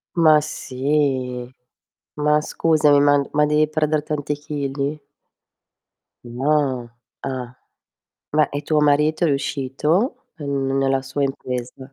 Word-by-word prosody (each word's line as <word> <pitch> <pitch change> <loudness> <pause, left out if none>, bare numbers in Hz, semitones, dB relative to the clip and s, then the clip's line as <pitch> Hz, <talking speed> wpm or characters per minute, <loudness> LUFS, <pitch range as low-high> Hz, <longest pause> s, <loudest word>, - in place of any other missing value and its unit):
Ma 155 -3 +6
sì, 130 -3 -2 0.6
ma 150 0 +2
scusami, 150 -2 +3
ma 145 0 +4
ma 150 0 +4
devi 150 +1 +2
perder 155 -1 0
tanti 150 -1 -2
chili? 145 0 -3 1.3
No, 130 0 0 0.3
ah. 130 -2 -5 0.8
Ma, 150 0 +3
e 145 - -2
tuo 155 0 +1
marito 150 +3 +3
è - - +3
riuscito 145 - -1
n 140 -2 -2
nella 135 0 +2
sua 135 +2 -3
impresa? 130 0 -5
145 Hz, 110 wpm, -21 LUFS, 135-150 Hz, 1.3 s, Ma